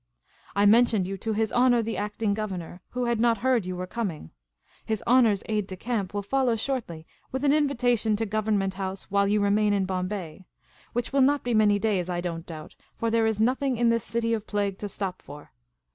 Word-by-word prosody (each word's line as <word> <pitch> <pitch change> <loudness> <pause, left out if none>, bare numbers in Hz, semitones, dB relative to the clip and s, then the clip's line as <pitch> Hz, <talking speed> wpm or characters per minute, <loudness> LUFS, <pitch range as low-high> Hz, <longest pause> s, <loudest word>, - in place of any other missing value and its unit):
" - - -32
I 200 +1 +3
mentioned 220 -3 +4
you 195 - -3
to 220 +3 -2
His 220 0 -1
Honour 245 -1 +4
the 225 0 -3
Acting 210 0 -1
Governor, 190 -4 -5
who 250 0 -2
had 235 -2 0
not 235 -1 +3
heard 240 -4 +1
you 185 - -3
were 180 +1 -4
coming. 180 - -5 0.5
His 220 -2 -3
Honour's 235 -5 +4
aide 210 -2 -1
de 190 - -6
camp 210 -4 -2
will 205 - -1
follow 255 +2 +1
shortly 220 -10 -4 0.3
with 265 +1 -3
an 285 -1 +4
invitation 245 -7 +2
to 225 +2 -1
Government 205 -2 0
House 190 0 -5
while 200 0 +3
you 210 +1 +2
remain 205 +1 +2
in 195 -2 +1
Bombay 185 -2 -4 0.2
— - - -30
which 240 +2 -2
will 275 - +4
not 285 +2 +3
be 245 - -1
many 210 -2 +4
days, 195 -4 0
I 175 -1 -1
don't 170 -1 -5
doubt, 155 -2 -9 0.2
for 230 0 -1
there 225 -1 +3
is 220 -1 -1
nothing 255 +3 +1
in 235 0 +3
this 230 -2 +1
city 230 +1 -1
of 215 -1 -3
plague 200 -2 -1
to 205 - -4
stop 190 -2 -4
for. 145 +1 -12
215 Hz, 220 wpm, -26 LUFS, 195-235 Hz, 0.5 s, mentioned